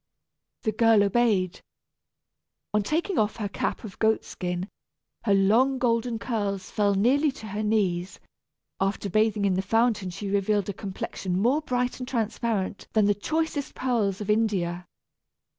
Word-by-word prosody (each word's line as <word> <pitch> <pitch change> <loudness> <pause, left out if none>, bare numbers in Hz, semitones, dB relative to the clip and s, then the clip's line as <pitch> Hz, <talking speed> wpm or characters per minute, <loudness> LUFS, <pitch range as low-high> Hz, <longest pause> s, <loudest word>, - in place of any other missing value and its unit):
The 220 - +1
girl 225 -1 +4
obeyed. 200 -4 +1 1.1
On 210 - +3
taking 325 - 0
off 215 0 +1
her 215 -3 -3
cap 195 - -3
of 205 -4 -9
goat 220 0 +2
skin 180 0 -4 0.6
her 200 - +4
long 230 +8 +4
golden 235 -1 +1
curls 205 -5 -3
fell 205 -2 +2
nearly 275 +9 +3
to 220 - -10
her 205 +2 -3
knees. 190 -4 0 0.6
After 195 0 -1
bathing 215 0 +2
in 195 - +3
the 185 - +1
fountain 225 -1 +1
she 195 +2 -5
revealed 200 0 +1
a - - -2
complexion 190 -2 -4
more 255 +9 +2
bright 250 -4 -1
and 250 - -5
transparent 225 -4 -2
than 215 -2 +4
the 205 - +4
choicest 310 +6 -2
pearls 220 -6 0
of 210 0 0
India. 180 -5 0
210 Hz, 150 wpm, -26 LUFS, 195-235 Hz, 1.1 s, girl